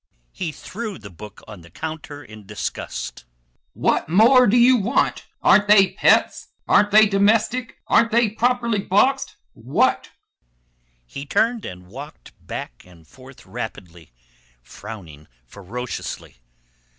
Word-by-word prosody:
He 170 -4 -4
threw 215 +7 -7
the 100 -3 -12
book 105 +3 -12
on 105 -5 -11
the 85 - -16
counter 150 - -7
in 110 -4 -14
disgust. 100 - -6 0.5
"What - - 0
more 240 +8 +6
do 220 +4 +3
you 245 +2 +6
want? 230 +4 0 0.2
Aren't 205 0 +5
they 200 -2 +6
pets? - - +2 0.2
Aren't 205 - +4
they 215 +1 +7
domestic? 215 +4 +1
Aren't 230 +1 +3
they 235 +1 +3
properly 235 0 0
boxed? 205 +8 +1 0.2
What?" - - 0 1.0
He 140 - -9
turned 230 - 0
and 90 -2 -9
walked 135 +11 -11
back - - -8
and 85 -3 -19
forth 130 0 -16
rapidly; 95 - -8 0.5
frowning 80 - -11 0.2
ferociously. 100 - -7
155 Hz, 125 wpm, -21 LUFS, -, 1.0 s, they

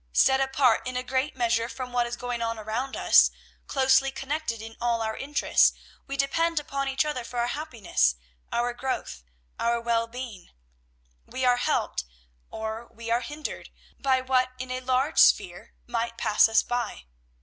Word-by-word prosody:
Set 265 0 +4
apart 265 -3 +3
in 255 0 -3
a 250 - -2
great 260 +3 -1
measure 235 -2 +1
from 250 +1 -7
what 240 -1 +1
is 240 - -4
going 245 -1 -4
on 230 0 -1
around 225 +5 -3
us, - - +6 0.4
closely 265 0 +3
connected 270 -3 -3
in 225 +1 -9
all 235 -1 +1
our 220 0 -2
interests, 290 +2 +3 0.3
we 275 - -4
depend 330 +4 +1
upon 275 -1 -3
each 270 +2 +1
other 295 -5 -3
for 245 +1 -8
our 235 - +2
happiness, 220 - 0 0.4
our 240 0 0
growth, 240 - -4 0.4
our 235 0 +1
well 230 0 0
being. 235 -6 -8 0.8
We 260 - -2
are 245 -1 +4
helped, 245 - 0 0.5
or 220 +1 -5
we 230 0 -7
are 235 +1 +2
hindered, 295 +5 -6 0.3
by 260 -1 +2
what 255 0 +2
in 255 +1 -6
a 255 - -2
large 260 +4 +1
sphere - - +3
might 230 -1 -3
pass 215 0 +4
us 225 - +4
by. 245 - -3
245 Hz, 170 wpm, -26 LUFS, 230-265 Hz, 0.8 s, us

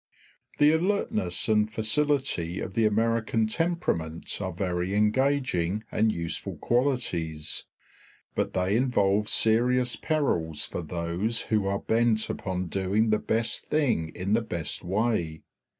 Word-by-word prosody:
The 150 +1 +5
alertness 160 - 0
and 105 -1 +2
facility 110 - 0
of - - -5
the 110 +1 +3
American 115 +1 +1
temperament 110 - -2
are 95 -1 -2
very 90 +1 -2
engaging 105 -4 +1
and 110 +1 +2
useful 85 -4 -4
qualities, 90 - -1 0.7
but - - -1
they 95 +2 +1
involve 105 -4 +2
serious 125 +3 +3
perils 85 - 0
for - - -5
those 85 +7 -1
who 105 -3 0
are 100 0 0
bent 110 0 +1
upon 95 -1 -3
doing 100 +5 0
the 105 - +3
best 115 +2 -1
thing 130 - 0
in 95 +3 -1
the 115 - +3
best 85 -8 -3
way. 95 -5 -1
105 Hz, 125 wpm, -27 LUFS, 90-120 Hz, 0.7 s, The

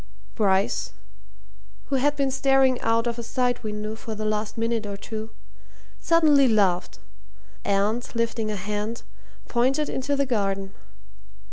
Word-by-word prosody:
Bryce, 195 - +1 1.0
who 275 - +2
had 290 +3 +2
been 275 -2 0
staring 270 -1 +3
out 230 +1 +2
of 235 0 -2
a - - -2
side 245 +1 -1
window 215 0 -4
for 220 0 -7
the 215 0 -4
last 215 0 -2
minute 225 -1 -1
or 200 -1 -5
two, 220 +1 -6 0.7
suddenly 305 -5 +5
laughed, 195 -6 +2 0.7
and, 205 +4 +1
lifting 230 -1 -1
a 210 - -2
hand, 210 +3 -3 0.4
pointed 265 +5 +1
into 280 +2 -1
the 280 0 +1
garden. 195 -5 -1
230 Hz, 135 wpm, -25 LUFS, 210-260 Hz, 1.0 s, suddenly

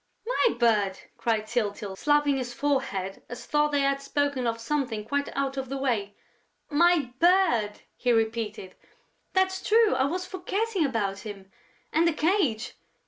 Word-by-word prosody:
"My - - +2
bird!" 210 -5 +2 0.2
cried 220 -2 0
Tyltyl, 210 -4 -2
slapping 295 +3 +2
his 245 -2 -4
forehead 245 -10 -1
as 245 - -8
though 300 0 +2
they 290 -1 +1
had 275 0 +1
spoken 280 -2 -1
of 230 0 -1
something 230 -4 -2
quite 285 +5 -1
out 275 0 -1
of 265 -2 -3
the 275 - -3
way. 220 -7 -1 0.6
"My 310 -4 +3
bird!" 330 - +3
he 250 - 0
repeated. 220 -4 -1 0.6
"That's 380 0 +1
true, 445 0 +4
I 265 - +2
was 360 +6 -2
forgetting 380 +2 -1
about 200 -6 -2
him!... 195 -3 -9 0.4
And 330 +2 +4
the 335 - +2
cage!... 300 - +1
270 Hz, 150 wpm, -27 LUFS, 220-300 Hz, 0.6 s, true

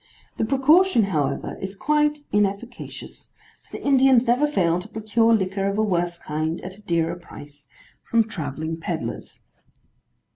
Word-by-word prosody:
The - - 0
precaution, 280 - +4
however, 150 -8 -2
is 190 +1 -4
quite 300 +4 +1
inefficacious, 205 +4 -3 0.3
for - - -10
the - - -12
Indians 265 -3 +5
never 250 +5 +3
fail 175 - +1
to 180 - -9
procure 220 +1 +1
liquor 195 -2 +1
of 200 +1 -1
a 220 - +2
worse 175 -4 0
kind, 155 +1 -3
at 185 +1 -8
a 210 - -17
dearer 170 -4 0
price, 145 -4 -12 0.4
from 230 -1 +4
travelling 160 -3 -4
pedlars. 165 - -5
200 Hz, 145 wpm, -23 LUFS, 170-240 Hz, 0.4 s, Indians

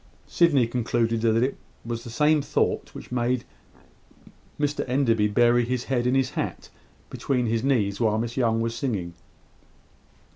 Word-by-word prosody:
Sydney 150 -8 +3
concluded 115 -1 -1
that 115 +1 +2
it 135 - -1 0.3
was 115 0 -4
the 120 - -8
same 150 +5 +3
thought - - -1
which - - -10
made 125 0 0 1.2
Mr 145 0 0
Enderby 115 -5 +2
bury 120 +3 +3
his 125 +1 -2
head 125 -2 -1
in 125 - +2
his 135 -1 +1
hat - - -4 0.4
between 125 -3 -1
his 115 0 0
knees 105 -8 +1
while 110 -2 +2
Miss 115 +1 -3
Young 115 -3 +1
was 115 0 -1
singing. 105 -9 -3
120 Hz, 150 wpm, -25 LUFS, 115-130 Hz, 1.2 s, Sydney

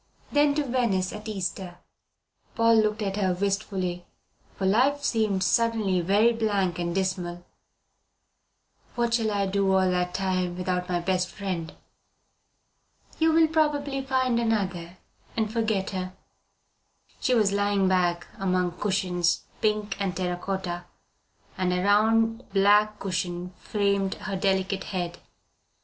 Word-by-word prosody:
Then 290 0 +3
to 300 - +1
Venice 235 -8 0
at 210 +1 -8
Easter." 185 -3 -4 0.8
Paul 230 0 +4
looked 215 0 -1
at 195 0 -2
her 190 -3 +1
wistfully, 190 -2 -2 0.5
for 190 - -3
life 260 +9 +3
seemed 215 -6 +1
suddenly 215 -3 +2
very 205 +7 +3
blank 200 -6 0
and 170 0 -2
dismal. 180 -2 -2 1.5
"What 235 -1 0
shall 225 -2 +2
I 200 -1 0
do 195 0 +1
all 190 -1 +3
that 180 0 -1
time 185 -2 -1
without 180 0 -2
my 175 -1 +1
best 180 0 0
friend?" 180 -4 -4 1.5
"You 320 0 +4
will 325 0 +5
probably 290 -3 0
find 260 -2 +1
another 190 -6 -1 0.4
and 220 -1 0
forget 220 -4 0
her." 185 -1 -4 1.1
She 255 - +2
was 210 -4 +3
lying 200 -1 +1
back 175 -2 +1
among 185 -2 0
cushions, 180 -4 0 0.2
pink 210 -1 0
and 190 -3 -1
terra 180 -1 -1
cotta, 175 -2 -4 0.7
and 185 -1 +1
a 180 0 0
round 225 +3 +2
black 210 +2 +4
cushion 180 -2 -3
framed 200 -2 0
her 195 - -5
delicate 190 0 0
head. 175 -2 -4
195 Hz, 130 wpm, -26 LUFS, 185-220 Hz, 1.5 s, will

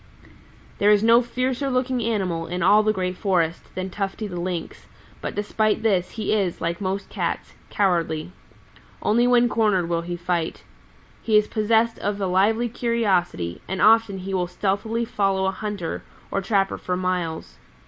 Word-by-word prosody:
"There 205 - +4
is 210 0 +5
no 230 +1 +6
fiercer 255 +3 -2
looking 255 -1 0
animal 190 -7 -1
in 180 +2 -2
all 205 +4 +6
the 215 0 +2
Green 185 -3 -2
Forest 175 -4 -1
than 185 0 -4
Tufty 195 +3 -3
the 180 -4 -5
Lynx, 175 -1 -5 0.3
but - - -4
despite 210 +1 0
this 190 -5 +2
he 215 -2 -2
is, 195 -5 0
like 170 +2 -2
most 195 +1 -2
Cats, - - -3 0.2
cowardly. 175 -5 0 0.7
Only 235 +3 +3
when 245 -1 +5
cornered 210 -7 +1
will 170 -1 0
he 175 +1 -4
fight. 170 -1 -2 0.6
He 220 -2 +3
is 210 0 +3
possessed 225 +1 +1
of 205 0 -2
a 195 - 0
lively 205 +6 +2
curiosity, 195 - 0
and 190 0 -3
often 220 -1 +5
he 190 +1 -5
will 180 -2 0
stealthily 210 +5 -1
follow 195 -3 0
a 190 - +2
hunter 200 -3 -4 0.3
or 195 - 0
trapper 195 0 0
for 180 0 -2
miles. 180 -3 -3
195 Hz, 165 wpm, -23 LUFS, 180-220 Hz, 0.7 s, no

